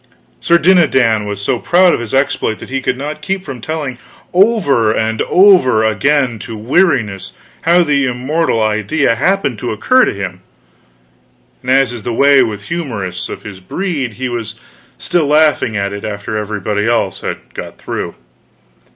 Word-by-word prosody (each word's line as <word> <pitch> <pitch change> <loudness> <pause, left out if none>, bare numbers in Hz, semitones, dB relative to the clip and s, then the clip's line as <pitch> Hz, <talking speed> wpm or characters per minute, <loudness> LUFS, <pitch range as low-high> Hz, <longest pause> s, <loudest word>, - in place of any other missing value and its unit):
Sir 170 - +3
Dinadan 130 - +3
was 100 -1 -5
so 120 +3 0
proud 180 +5 +4
of - - 0
his 120 -3 -6
exploit 135 -5 0
that - - -11
he 135 0 -1
could 125 - -1
not 150 +3 -5
keep 195 -1 -3
from 130 -5 -7
telling 145 -3 -4 0.3
over 175 - +3
and 110 0 -1
over 180 - +5
again, 125 +2 +1
to 110 +2 -7
weariness, 115 - 0 0.3
how 175 +2 +4
the 140 -4 +1
immortal 125 0 0
idea 110 +6 +1
happened 140 - 0
to 120 - -3
occur 255 - +3
to - - -1
him; 95 -2 -6 1.2
and 125 - -7
as 130 -1 +3
is 120 - -7
the 120 - -4
way 140 +2 +5
with 105 -2 -2
humorists 105 - -4
of - - -8
his 100 -3 -9
breed, 140 - -3
he 130 +4 -4
was 115 -3 -5 0.4
still 170 -4 0
laughing 150 -7 +2
at 100 0 -2
it 100 - -7
after 100 0 -5
everybody 105 0 -2
else 115 -5 0
had - - -6
got - - -8
through. - - -5
125 Hz, 165 wpm, -15 LUFS, 110-155 Hz, 1.2 s, over